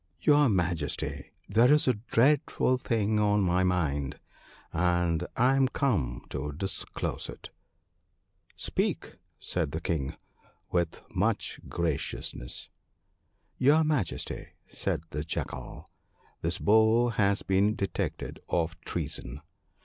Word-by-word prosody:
* - - -40
Your 145 +6 +5
Majesty, 90 -4 -1 0.2
there 115 +6 +5
is 150 -1 +4
a 130 - +5
dreadful 125 +3 +2
thing 110 -4 +1
on 105 -1 +3
my 90 0 +2
mind, 75 -7 0 0.5
and 85 -1 +1
I 125 +3 +4
am 135 -1 +4
come 100 - 0
to 75 +2 -3
disclose 95 +6 -4
it.' - - -9 0.6
* - - -38
Speak! - - -1
' - - -45
said 70 - -2
the 80 - -1
King, 75 -6 -2 0.6
with 85 -2 0
much - - 0
graciousness. 70 -7 -3 0.9
'Your 145 +5 +5
Majesty/ 145 - -1 0.2
said - - -2
the 75 +1 -2
Jackal, 80 - -5 0.5
'this 85 +2 0
Bull 110 +3 +4
has 100 -2 +2
been 100 +3 +2
detected 100 - -3
of 85 0 -1
treason. 65 +4 -4
95 Hz, 120 wpm, -29 LUFS, 80-115 Hz, 0.9 s, Your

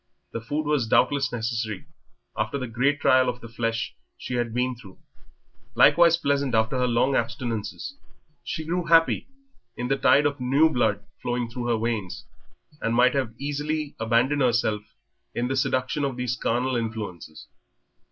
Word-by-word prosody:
The 115 - -4
food 145 +7 -3
was 145 -6 +1
doubtless 135 +3 +2
necessary 115 -3 -3 0.5
after 110 +5 -1
the 130 - -3
great 130 +5 0
trial 130 -1 +4
of 125 0 -4
the 115 - -10
flesh 115 0 -3 0.2
she - - -6
had 120 -2 -1
been 125 +2 0
through, 100 -6 -14 0.8
likewise 170 -1 +6
pleasant 140 -5 0
after 110 +4 +1
her 125 - +2
long 125 +3 +2
abstinences. 125 - -3 0.4
She 160 - -4
grew 175 +2 -1
happy 165 0 +4 0.5
in 125 0 -3
the 135 - +2
tide 145 +2 +4
of 145 -1 0
new 140 +6 +3
blood 110 -6 0 0.2
flowing 120 -1 -2
in 120 -1 -3
her 120 -1 +2
veins, 110 -5 -3 0.6
and 115 0 0
might 125 +1 +5 0.2
easily 145 +2 -3
have 110 - -3
abandoned 125 +6 +2
herself 115 -4 +2 0.5
in 120 +1 -1
the 135 - 0
seduction 130 +2 0
of 135 -3 -2
these 125 -1 -1
carnal 125 +2 0
influences. 105 -9 -5
125 Hz, 160 wpm, -25 LUFS, 115-140 Hz, 0.8 s, likewise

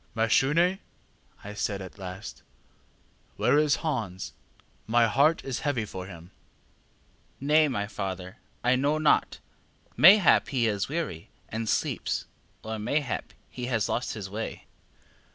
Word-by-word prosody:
ŌĆ£ŌĆśMashune, 135 +6 +3
ŌĆÖ 180 +3 +3 0.6
I 105 - -7
said 105 -1 -2
at 95 +1 -10
last, 95 +3 -8 1.0
ŌĆśwhere 150 - +4
is 150 -1 +3
Hans? 110 - -3 0.5
my 115 +1 +4
heart 140 +9 +3
is 135 -3 -3
heavy 130 -7 -1
for 95 -2 -7
him. 85 -1 -12 1.1
ŌĆÖ 140 - -6
ŌĆ£ŌĆśNay, 155 0 +5
my 105 -6 -1
father, 95 -1 -5 0.3
I 125 +1 +4
know 145 +4 +1
not; 155 -1 +2 0.6
mayhap 190 +1 +7
he 125 -4 0
is 100 0 -1
weary, 150 - -4 0.2
and 110 0 -3
sleeps, - - -1 0.4
or 110 0 -4
mayhap 140 +5 -2 0.2
he 125 -1 -6
has 115 -5 0
lost 120 -1 -2
his 100 -3 -5
way. 110 +3 -6
115 Hz, 135 wpm, -27 LUFS, 100-145 Hz, 1.1 s, mayhap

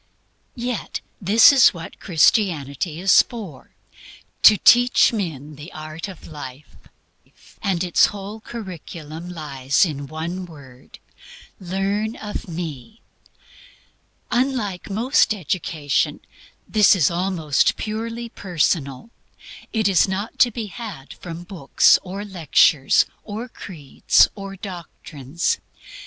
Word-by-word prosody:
Yet 245 -1 -4 0.2
this 215 +8 +7
is 260 -8 +6
what 165 -1 -9
Christianity 160 - +1
is 190 +2 +6
for 200 - -10 0.7
to 215 - +8
teach 245 +4 +5
men 155 - -5
THE 150 +4 -10
ART 155 +3 -7
OF 190 -4 -11
LIFE. 145 -2 -10 0.9
And 190 -4 0
its 175 -2 +4
whole 205 +1 -8
curriculum 175 -7 -8
lies 140 -3 0
in 145 -4 -5
one 170 +5 -5
word 135 -6 -15 0.6
"Learn 195 +4 -2
of 210 -2 -7
me." 170 - -7 1.3
Unlike 240 -8 -1
most 220 +2 +2
education, 160 -5 -2 0.5
this 210 -2 +5
is 165 -6 +2
almost 170 -5 +1
purely 230 +2 -4
personal; 170 - -2 0.6
it 220 -3 +1
is 195 -1 +4
not 195 +4 -4
to 245 - +6
be 230 -1 -5
had 200 - -9
from 170 -1 -9
books, 175 -7 +3
or 195 +3 -7
lectures 160 -6 +3 0.2
or 220 +3 -6
creeds 160 - +1
or 195 -1 -8
doctrines. 170 - -4
180 Hz, 110 wpm, -21 LUFS, 155-210 Hz, 1.3 s, to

